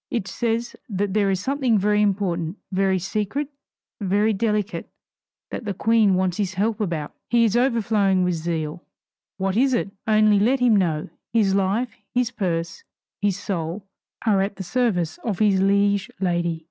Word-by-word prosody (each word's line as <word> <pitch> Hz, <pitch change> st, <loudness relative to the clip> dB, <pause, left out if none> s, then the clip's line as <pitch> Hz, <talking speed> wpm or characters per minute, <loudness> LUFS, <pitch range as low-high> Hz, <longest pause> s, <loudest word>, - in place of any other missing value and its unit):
It 220 Hz, -5 st, -2 dB
says 235 Hz, 0 st, -2 dB
that 200 Hz, -1 st, -1 dB
there 205 Hz, -2 st, +2 dB
is 190 Hz, -1 st, +1 dB
something 260 Hz, -1 st, +1 dB
very 210 Hz, +1 st, +2 dB
important, 190 Hz, -4 st, 0 dB
very 190 Hz, 0 st, +2 dB
secret, 210 Hz, -, -2 dB, 0.5 s
very 205 Hz, +2 st, +2 dB
delicate, 210 Hz, 0 st, -1 dB, 0.6 s
that -, -, -5 dB
the 200 Hz, -2 st, -3 dB
queen 220 Hz, -2 st, +3 dB
wants 185 Hz, -1 st, 0 dB
his 190 Hz, -3 st, -2 dB
help 220 Hz, +3 st, 0 dB
about. 165 Hz, -7 st, -2 dB, 0.2 s
He 235 Hz, -1 st, +4 dB
is 225 Hz, -1 st, +2 dB
overflowing 215 Hz, -6 st, +2 dB
with 180 Hz, 0 st, +1 dB
zeal. 165 Hz, 0 st, -3 dB, 0.6 s
What 190 Hz, 0 st, -1 dB
is 260 Hz, +2 st, +3 dB
it? 200 Hz, -4 st, -1 dB, 0.2 s
Only 215 Hz, -1 st, +4 dB
let 250 Hz, +6 st, +3 dB
him 245 Hz, -3 st, +4 dB
know 165 Hz, -7 st, 0 dB, 0.2 s
his 210 Hz, -4 st, +3 dB
life, 200 Hz, +5 st, 0 dB, 0.2 s
his 245 Hz, -1 st, +1 dB
purse, 175 Hz, -, -3 dB, 0.4 s
his 200 Hz, -2 st, +1 dB
soul, 180 Hz, 0 st, -4 dB, 0.4 s
are 205 Hz, -4 st, +3 dB
at 200 Hz, +1 st, -2 dB
the 195 Hz, -, -6 dB
service 180 Hz, -8 st, 0 dB
of 210 Hz, -6 st, -2 dB
his 200 Hz, -2 st, +3 dB
liege 200 Hz, 0 st, +2 dB
lady. 175 Hz, -3 st, 0 dB
200 Hz, 160 wpm, -23 LUFS, 185-220 Hz, 0.6 s, He